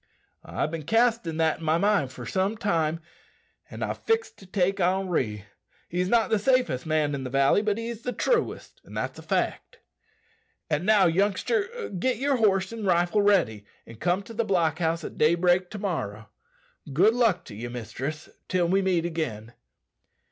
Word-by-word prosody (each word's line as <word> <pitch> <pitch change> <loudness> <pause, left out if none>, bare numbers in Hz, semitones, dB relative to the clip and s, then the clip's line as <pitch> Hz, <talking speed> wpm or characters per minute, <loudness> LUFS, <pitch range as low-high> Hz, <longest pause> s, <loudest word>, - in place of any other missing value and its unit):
"I've' 155 - -3
bin 165 -1 -4
castin' 225 - +1
that 160 -1 +1
in - - -10
my 160 +1 +3
mind 200 -8 +2
for - - -9
some 195 +3 -1
time, 165 -7 0 0.7
an' - - -6
I've - - -3
fixed 450 0 -1
to 195 - -14
take 195 +1 0
Henri. 175 - 0 0.4
He's 180 +1 -1
not 230 0 +2
the 220 - +3
safest 245 - +1
man 155 -2 +1
in 135 -2 -3
the 130 - -4
valley, 135 +8 +3
but 210 -1 0
he's 230 0 -5
the 250 - -3
truest, 465 - -1
that's - - -5
a - - -8
fact. - - -2 0.9
And 155 +5 0
now, 210 -3 +5
youngster, 380 - 0
get 220 +6 -1
yer 275 +2 +1
horse 195 -2 +2
an' 225 -2 -6
rifle 175 +2 +2
ready, 170 - +2 0.2
and 115 -1 -13
come 180 +3 0
to 230 - -11
the 230 +1 0
block 170 -6 +1
house 165 0 0
at - - -8
daybreak 175 +3 +3
to 215 - -7
morrow. 110 - -4 0.6
Good 190 +11 +4
luck 225 -8 +2
to 105 - -10
ye, 115 +3 -5
mistress, 130 +6 -5 0.2
till 180 -2 +1
we 195 +2 +3
meet 180 -3 +1
agin." 120 -10 -4
180 Hz, 175 wpm, -26 LUFS, 155-210 Hz, 0.9 s, now